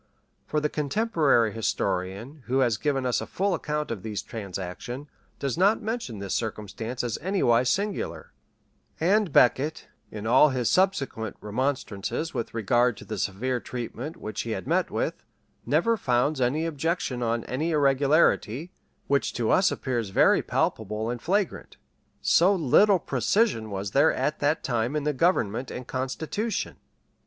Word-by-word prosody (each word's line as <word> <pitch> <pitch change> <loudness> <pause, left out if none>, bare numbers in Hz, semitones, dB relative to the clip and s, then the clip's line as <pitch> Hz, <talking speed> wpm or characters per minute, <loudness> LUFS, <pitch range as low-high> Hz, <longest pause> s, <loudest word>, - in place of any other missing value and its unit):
For 150 - 0
the 150 - +1
contemporary 150 - +2
historian, 100 +5 -2
who 130 +2 +1
has 120 -4 +2
given 135 0 -1
us 125 - +1
a - - -6
full 195 +1 0
account 150 -3 -2
of 110 -5 -4
these 105 -1 -4
transactions, 105 +6 -6 0.3
does 140 +3 -2
not 200 +4 +3
mention 220 - -3
this 100 -1 -4
circumstance 110 +2 -4
as 120 -2 -2
anywise 130 -10 +2
singular; 200 0 -2 0.7
and 195 +2 +2
Becket, 135 +5 +3 0.2
in 105 0 -7
all 130 +6 +6
his 125 -3 0
subsequent 140 - 0
remonstrances 130 - -2
with 120 -4 -3
regard 120 +1 +2
to - - -11
the 110 -3 -5
severe 120 +7 -1
treatment 125 - -6
which 110 -9 -5
he 115 - -3
had 95 - -7
met 175 +6 +1
with, 165 - -3 0.4
never 165 - +3
founds 130 - +1
any 140 +6 +1
objection 160 -4 -2
on 115 -1 0
an 130 +3 -4
irregularity, 145 -1 +2 0.3
which 140 0 +1
to 115 -2 0
us 190 +1 +4
appears 120 -6 -2
very - - +4
palpable 110 +2 -1
and 120 -1 -5
flagrant. 195 +1 -1 0.4
So 185 +4 +4
little 190 +5 +5
precision 135 - +1
was 100 0 -4
there 145 +7 +5
at 150 - -1
that 145 +2 +1
time 120 +3 -1
in 150 - 0
the 150 0 0
government 130 - +1
and 125 - -6
constitution! 160 - -3
130 Hz, 150 wpm, -26 LUFS, 115-160 Hz, 0.7 s, all